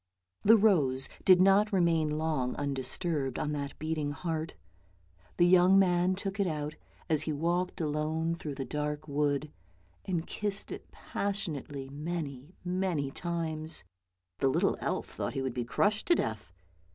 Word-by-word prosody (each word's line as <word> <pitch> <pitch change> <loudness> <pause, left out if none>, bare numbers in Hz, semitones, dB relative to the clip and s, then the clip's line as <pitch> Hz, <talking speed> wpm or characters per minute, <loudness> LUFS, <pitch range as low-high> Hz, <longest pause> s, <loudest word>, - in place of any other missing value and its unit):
The 225 +2 +7
rose 145 -12 +3 0.2
did 185 -1 +7
not 195 +3 +5
remain 165 -5 +2
long 155 -5 -1
undisturbed 140 +1 -2
on 150 -1 -1
that 140 -1 -4
beating 155 -2 -2
heart; 160 0 -4 0.8
the 175 - +5
young 180 +2 +6
man 180 -1 +3
took 195 +1 -5
it 200 - +2
out, 150 -2 -3 0.3
as 155 -3 +5
he 155 - -2
walked 175 +5 -1
alone 160 +1 -1
through 150 -4 -5
the 135 - -4
dark 150 +3 -3
wood, 145 0 0 0.5
and 175 -3 -1
kissed 205 -1 -2
it - - -8
passionately 150 -9 -4
many, 150 0 -5
many 180 -6 -1
times; 160 - 0 0.6
the 135 - +3
little - - +2
elf - - -2
thought - - -5
he 135 - -1
would 130 -2 -2
be 125 - -2
crushed 205 - +1
to 345 - +5
death. 110 - -3
160 Hz, 150 wpm, -30 LUFS, 145-180 Hz, 0.8 s, The